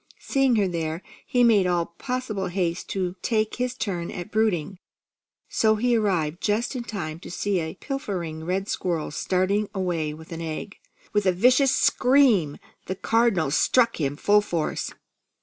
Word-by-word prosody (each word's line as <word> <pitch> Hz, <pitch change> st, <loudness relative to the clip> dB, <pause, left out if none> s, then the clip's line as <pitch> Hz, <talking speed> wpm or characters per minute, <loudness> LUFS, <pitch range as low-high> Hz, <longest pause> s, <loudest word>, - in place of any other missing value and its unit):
Seeing 270 Hz, -3 st, +1 dB
her 205 Hz, -3 st, +2 dB
there, 165 Hz, -1 st, -3 dB, 0.2 s
he 245 Hz, -1 st, +3 dB
made 210 Hz, -6 st, +5 dB
all 175 Hz, -1 st, +1 dB
possible 250 Hz, -7 st, -3 dB
haste 175 Hz, -1 st, -2 dB
to 185 Hz, -2 st, -2 dB
take 220 Hz, -3 st, 0 dB
his 250 Hz, 0 st, -1 dB
turn 180 Hz, -9 st, -3 dB
at 175 Hz, -, -7 dB
brooding, 200 Hz, -5 st, 0 dB, 0.7 s
so 220 Hz, -1 st, +2 dB
he 240 Hz, +2 st, +2 dB
arrived 180 Hz, -7 st, 0 dB
just 220 Hz, +5 st, 0 dB
in 245 Hz, -, -3 dB
time 165 Hz, -9 st, -5 dB
to -, -, -10 dB
see 195 Hz, +2 st, -1 dB
a 160 Hz, +2 st, -4 dB
pilfering 185 Hz, -, -4 dB
red 190 Hz, +4 st, -2 dB
squirrel 170 Hz, -8 st, -2 dB
starting 190 Hz, +6 st, 0 dB
away 175 Hz, -5 st, -1 dB
with 160 Hz, +2 st, -11 dB
an 165 Hz, 0 st, -5 dB
egg. 165 Hz, +5 st, -6 dB, 0.3 s
With 210 Hz, -2 st, +2 dB
a -, -, +6 dB
vicious 250 Hz, +8 st, +4 dB
scream 250 Hz, -, +3 dB, 0.3 s
the 190 Hz, -, -2 dB
Cardinal 215 Hz, -8 st, +2 dB
struck 230 Hz, -, +3 dB
him 140 Hz, 0 st, 0 dB
full 205 Hz, +7 st, +4 dB
force. 170 Hz, -6 st, -2 dB
195 Hz, 160 wpm, -25 LUFS, 170-225 Hz, 0.7 s, a